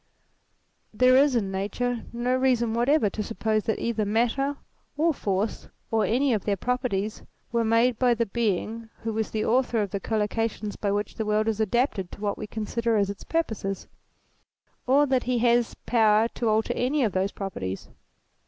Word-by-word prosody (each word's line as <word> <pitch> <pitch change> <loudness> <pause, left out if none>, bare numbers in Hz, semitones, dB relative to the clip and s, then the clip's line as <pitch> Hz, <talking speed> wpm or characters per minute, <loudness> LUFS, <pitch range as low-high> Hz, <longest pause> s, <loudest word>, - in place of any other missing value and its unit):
There 255 +3 +4
is 275 0 +5
in 200 -5 0
Nature 225 +5 -2
no 245 +2 0
reason 250 -3 +2
whatever 240 +2 +3
to 215 - -4
suppose 215 -1 -1
that 220 - 0
either 230 -2 -1
Matter 240 +7 0 0.4
or 325 +2 +3
Force, 200 -3 -2 0.2
or 220 -1 +2
any 255 +3 +2
of 210 - -1
their 200 -2 0
properties, 225 -3 -2 0.3
were 235 -1 +1
made 230 +1 +2
by 245 -2 +4
the 230 0 0
Being 225 +1 -2
who 225 -1 -2
was 220 0 -1
the 215 -1 -2
author 245 0 +2
of 205 -3 -1
the 200 - -2
collocations 215 0 -2
by 200 - -1
which 205 +1 -2
the 220 - -3
world 215 +1 +1
is 220 -1 0
adapted 220 -3 0
to - - -9
what 205 -1 -1
we 215 - -5
consider 225 +1 -1
as 200 -1 +1
its 200 - -10
purposes; 220 -12 -2 1.0
or 280 +3 +5
that 260 -3 +1
he 250 0 +1
has 240 0 +2
power 220 -1 +4
to 235 -1 -2
alter 220 +1 +1
any 270 +3 +1
of 220 - +1
those 190 +2 0
properties. 95 - -5
225 Hz, 180 wpm, -26 LUFS, 210-245 Hz, 1.0 s, is